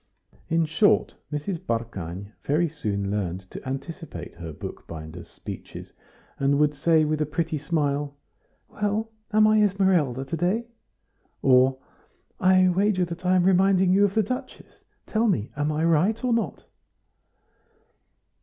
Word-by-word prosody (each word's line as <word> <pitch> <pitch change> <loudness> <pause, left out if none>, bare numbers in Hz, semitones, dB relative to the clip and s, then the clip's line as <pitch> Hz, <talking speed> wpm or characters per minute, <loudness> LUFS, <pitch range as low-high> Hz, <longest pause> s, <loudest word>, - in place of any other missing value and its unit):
In 165 0 +2
short, 165 +7 +2 0.2
Mrs. 155 +4 -3
Barkany 100 - -4
very 155 +4 +1
soon 100 -10 -3
learned 95 -3 -2
to - - -8
anticipate 135 - -6
her 85 -2 -8
bookbinder's 80 +2 -8
speeches, - - -9 0.5
and 140 +1 +2
would 150 0 +3
say, 155 +2 +3
with 155 0 -1
a - - +2
pretty 160 0 -2
smile: 145 -1 -1 0.5
"Well, 210 +2 -2 0.2
am 215 0 +5
I 215 0 +5
Esmeralda 185 - +2
to 165 - -3
day?" 185 +8 0 0.8
or, 130 0 +5 0.6
"I 185 0 +5
wager 185 0 +2
that 175 +1 -6
I 185 - +4
am 180 - +4
reminding 190 0 +4
you 200 +2 +5
of 200 0 +1
the 220 - +4
Duchess; 255 +5 -7 0.2
tell 225 +1 +1
me, 120 - 0
am 145 +1 0
I 155 +2 0
right 175 - +2
or 250 -2 +2
not?" 230 - -2
160 Hz, 140 wpm, -25 LUFS, 135-190 Hz, 0.8 s, am